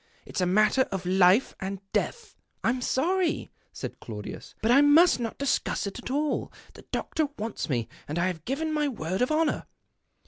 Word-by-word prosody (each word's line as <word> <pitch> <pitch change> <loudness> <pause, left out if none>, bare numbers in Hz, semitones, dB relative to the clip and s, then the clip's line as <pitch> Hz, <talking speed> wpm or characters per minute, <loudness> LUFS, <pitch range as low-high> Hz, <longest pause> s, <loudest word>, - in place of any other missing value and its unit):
It's - - -3
a 180 - +2
matter 215 +7 +4
of 190 -2 -3
life 185 +5 +4
or 195 +1 -3 0.2
death." 460 -3 -2
" - - -45
I'm 255 0 +1
sorry," 340 +7 0 0.2
said - - -7
Claudius, 105 -3 -8
" - - -37
hut 225 - +3
I 275 +3 +7
must 295 +2 +6
not 230 -2 -3
discuss 280 -5 0
it 200 +4 -5
at 245 - -7
all. 290 +3 -1 0.2
The - - -13
doctor 315 -2 -1
wants 215 -4 -4
me, 120 -5 0 0.2
and 150 - -3
I 175 - +2
have 175 -4 -3
given 310 +5 -1
my 300 -1 +1
word 190 - -3
of 250 - +3
honour." 310 0 +1
245 Hz, 195 wpm, -27 LUFS, 185-295 Hz, 0.2 s, I